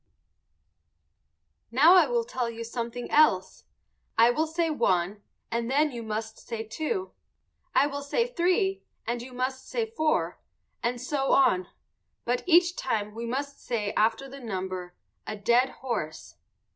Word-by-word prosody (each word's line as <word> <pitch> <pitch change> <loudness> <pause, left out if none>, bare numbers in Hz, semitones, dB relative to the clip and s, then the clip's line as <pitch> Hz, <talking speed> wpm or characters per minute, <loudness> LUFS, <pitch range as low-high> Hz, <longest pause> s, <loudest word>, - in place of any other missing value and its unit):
Now 290 +9 +7
I 370 - +7
will 475 -1 +1
tell 250 - -2
you 230 0 -6
something 235 +1 -5
else. 195 -12 +3 0.5
I 230 +2 +7
will 315 +6 0
say 325 0 0
one 195 - +1 0.3
and 235 0 -1
then 295 +3 +3
you 240 -2 -6
must 220 0 -4
say 230 -2 -5
two; 315 - -3 0.6
I - - +6
will 285 0 -3
say 375 - +1
three, 385 -2 +1 0.2
and 235 +1 -2
you 255 +2 -9
must 260 +1 -3
say 465 -2 0
four 315 -9 0 0.4
and 245 +1 -1
so 270 +2 0
on; 185 -9 +4 0.6
but 245 +1 0
each 350 0 +5
time 210 -4 -2
we 230 +1 -5
must 280 +3 -4
say 210 -4 -2
after 225 +5 +1
the 275 +1 -10
number 185 -6 -5 0.3
"a 215 - -3
dead 240 +5 +3
horse." 225 -15 -5
250 Hz, 145 wpm, -27 LUFS, 225-310 Hz, 0.6 s, Now